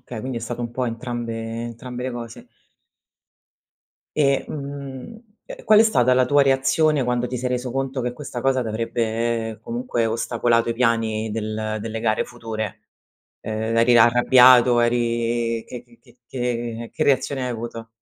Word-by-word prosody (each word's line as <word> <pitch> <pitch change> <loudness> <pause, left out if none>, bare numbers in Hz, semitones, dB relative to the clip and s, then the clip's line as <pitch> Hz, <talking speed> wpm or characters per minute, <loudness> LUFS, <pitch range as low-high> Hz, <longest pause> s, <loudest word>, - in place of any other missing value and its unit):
Okay, 120 -2 -8
quindi 130 +1 -5
è - - -11
stato 120 +1 -5
un 120 -1 -3
po' 125 +1 -2
entrambe 120 0 -4 0.3
entrambe 125 +2 -7
le 130 - -2
cose. 120 -2 -8 1.7
E, 140 -3 +2
mhmm, 140 - -7 0.2
ehm, - - -10
qual 215 -1 +6
è - - +8
stata 130 - +3
la 125 0 +3
tua 145 0 +4
reazione 140 +2 +2
quando 125 0 0
ti 125 0 -4
sei 125 +1 -2
reso 125 0 -2
conto 135 0 -2
che 125 0 -2
questa 125 -3 -7
cosa 130 -1 +2
t'avrebbe, 115 0 -2
comunque, 240 - -2
ostacolato 115 +1 +1
i 115 - 0
piani 115 -2 0
del 110 0 -3
delle 115 +1 -5
gare 110 -1 +1
future? 110 -3 -6 0.6
Ehm, 110 +1 -3
eri 120 +1 +5
arrabbiato, 125 +1 +6
eri 120 -1 0
che 125 -1 -8
che 120 -1 -23
che 120 -1 -21
che 120 -2 -3
che 155 - -2
reazione 135 -1 +1
hai 125 - -2
avuto? 115 -1 -6
120 Hz, 160 wpm, -22 LUFS, 115-130 Hz, 1.7 s, è